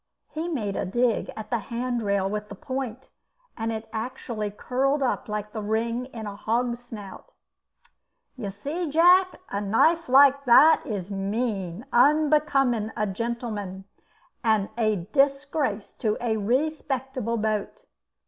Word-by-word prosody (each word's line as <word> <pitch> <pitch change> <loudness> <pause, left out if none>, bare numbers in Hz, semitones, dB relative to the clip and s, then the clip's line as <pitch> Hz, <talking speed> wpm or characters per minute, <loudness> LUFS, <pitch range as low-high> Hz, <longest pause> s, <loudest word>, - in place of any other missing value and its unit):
He 320 +2 -3
made 215 - -2
a - - -1
dig 240 +4 0
at 215 -1 -7
the 235 - +1
hand 240 +3 -3
rail 200 -2 +1
with 210 +1 -4
the - - -8
point, 265 -4 -5 0.4
and 225 0 -2
it 220 0 -5
actually 225 -2 -4
curled 270 +7 0
up 250 -2 -1
like 210 0 -4
the 220 - -4
ring 230 +4 -1
in 230 -4 -8
a 205 -1 -6
hog's 235 +3 -1
snout. 215 - -10 1.0
"You 225 -6 -5
see, 290 - -4
Jack, 360 +4 +5 0.2
a 200 - -1
knife 315 +11 +2
like 280 +1 +6
that 295 +6 +7
is 205 -4 -4
mean, 200 -1 -2
unbecoming 275 -5 +3
a 215 - +1
gentleman, 210 -3 -4 0.6
and 220 -3 +2
a 215 -6 0
disgrace 275 -5 +1
to 215 -1 0
a 235 -2 0
respectable 260 0 -1
boat." 215 - -2
235 Hz, 140 wpm, -26 LUFS, 210-270 Hz, 1.0 s, that